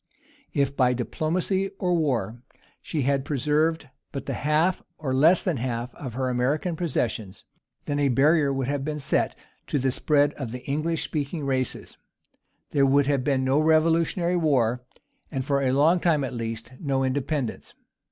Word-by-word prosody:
If, 140 Hz, -1 st, +1 dB
by 125 Hz, -2 st, +3 dB
diplomacy 180 Hz, -, -1 dB
or 180 Hz, -2 st, 0 dB
war, 120 Hz, -, 0 dB, 0.4 s
she 150 Hz, -4 st, -2 dB
had 135 Hz, 0 st, +1 dB
preserved 150 Hz, +3 st, 0 dB, 0.2 s
but 140 Hz, -, -5 dB
the -, -, -3 dB
half, 155 Hz, +5 st, +1 dB, 0.2 s
or 135 Hz, -4 st, -3 dB
less 160 Hz, +7 st, +5 dB
than 175 Hz, -7 st, 0 dB
the -, -, -5 dB
half, 120 Hz, -1 st, -3 dB
of 125 Hz, -5 st, -7 dB
her 130 Hz, 0 st, -1 dB
American 135 Hz, +8 st, 0 dB
possessions, 115 Hz, -, -2 dB, 0.4 s
then 145 Hz, 0 st, -1 dB
a 140 Hz, -1 st, +3 dB
barrier 145 Hz, +3 st, +3 dB
would 135 Hz, -2 st, -2 dB
have 140 Hz, -1 st, -1 dB
been 150 Hz, +1 st, -3 dB
set 145 Hz, -, 0 dB, 0.3 s
to -, -, 0 dB
the 130 Hz, -1 st, +1 dB
spread 145 Hz, +2 st, +2 dB
of 135 Hz, -5 st, -6 dB
the 125 Hz, +2 st, -8 dB
English 155 Hz, +4 st, -1 dB
speaking 150 Hz, 0 st, -3 dB
races; 130 Hz, -2 st, -2 dB, 0.7 s
there 140 Hz, -, +3 dB
would 140 Hz, +1 st, +4 dB
have 140 Hz, -2 st, +1 dB
been 135 Hz, -1 st, +1 dB
no 135 Hz, +3 st, +2 dB
Revolutionary 165 Hz, +3 st, +2 dB
War; 125 Hz, -7 st, +1 dB, 0.5 s
and 135 Hz, -4 st, -3 dB
for 140 Hz, -1 st, +1 dB
a 130 Hz, -2 st, +2 dB
long 155 Hz, +7 st, +4 dB
time, 160 Hz, -5 st, +2 dB
at 130 Hz, -, -4 dB
least, 115 Hz, 0 st, -5 dB
no 135 Hz, -3 st, 0 dB
independence. 135 Hz, 0 st, -2 dB
140 Hz, 170 wpm, -25 LUFS, 130-155 Hz, 0.7 s, less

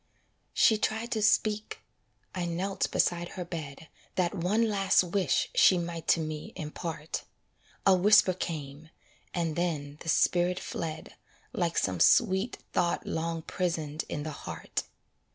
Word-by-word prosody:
She 220 Hz, -2 st, +5 dB
tried 220 Hz, +3 st, -1 dB
to 220 Hz, -3 st, 0 dB
speak; 210 Hz, 0 st, +1 dB, 0.5 s
I 180 Hz, -2 st, -2 dB
knelt 180 Hz, +3 st, -1 dB
beside 175 Hz, 0 st, +1 dB
her 180 Hz, -, -5 dB
bed, 160 Hz, -3 st, -7 dB, 0.3 s
That 180 Hz, -2 st, +1 dB
one 200 Hz, +5 st, +1 dB
last 195 Hz, -3 st, +3 dB
wish 180 Hz, -4 st, 0 dB
she 185 Hz, -, +6 dB
might 170 Hz, -1 st, -4 dB
to -, -, +4 dB
me 155 Hz, -1 st, -5 dB
impart; 160 Hz, +1 st, -5 dB, 0.6 s
A 195 Hz, -, +7 dB
whisper 195 Hz, 0 st, +5 dB
came, 155 Hz, -3 st, -6 dB, 0.4 s
and 165 Hz, -3 st, -1 dB
then 150 Hz, -5 st, -2 dB
the 165 Hz, -, -5 dB
spirit 175 Hz, +2 st, +2 dB
fled 160 Hz, -1 st, -5 dB, 0.4 s
Like 170 Hz, -2 st, -1 dB
some 95 Hz, -2 st, 0 dB
sweet 200 Hz, -, +4 dB, 0.2 s
thought 170 Hz, -1 st, 0 dB
long 165 Hz, 0 st, -2 dB
prisoned 160 Hz, -5 st, -2 dB
in 145 Hz, -, -3 dB
the 155 Hz, -, -4 dB
heart. 140 Hz, -, -5 dB
175 Hz, 135 wpm, -29 LUFS, 160-190 Hz, 0.6 s, A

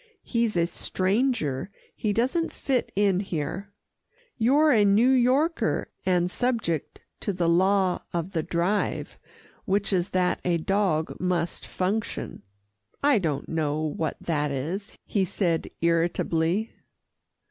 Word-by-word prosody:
He's 230 Hz, -5 st, 0 dB
a 170 Hz, -, +3 dB
stranger, 190 Hz, -, 0 dB, 0.3 s
he 215 Hz, -, -1 dB
doesn't 265 Hz, -, 0 dB
fit 260 Hz, -3 st, -1 dB
in 195 Hz, -2 st, +3 dB
here. 190 Hz, +2 st, -4 dB, 0.6 s
You're 285 Hz, +7 st, +4 dB
a 220 Hz, -5 st, +5 dB
New 210 Hz, +6 st, +5 dB
Yorker, 265 Hz, +6 st, +2 dB, 0.2 s
and 180 Hz, -1 st, +2 dB
subject 225 Hz, -, -1 dB, 0.2 s
to -, -, -2 dB
the 175 Hz, -3 st, 0 dB
law 185 Hz, +2 st, +3 dB
of 170 Hz, +2 st, -3 dB
the 165 Hz, -4 st, 0 dB
Drive, 175 Hz, +6 st, -1 dB, 0.5 s
which 200 Hz, +1 st, +1 dB
is 180 Hz, 0 st, +1 dB
that 180 Hz, -1 st, +1 dB
a 175 Hz, -1 st, +2 dB
dog 175 Hz, -2 st, 0 dB
must 180 Hz, -2 st, -1 dB
function." 200 Hz, +4 st, -3 dB, 0.6 s
"I 285 Hz, -6 st, +5 dB
don't 155 Hz, -7 st, -2 dB
know 155 Hz, -2 st, -1 dB
what 155 Hz, 0 st, -2 dB
that 150 Hz, -3 st, -1 dB
is," 165 Hz, +10 st, -4 dB
he 200 Hz, -, +1 dB
said 170 Hz, -3 st, -1 dB
irritably. 170 Hz, +3 st, +1 dB
185 Hz, 125 wpm, -26 LUFS, 170-220 Hz, 0.6 s, a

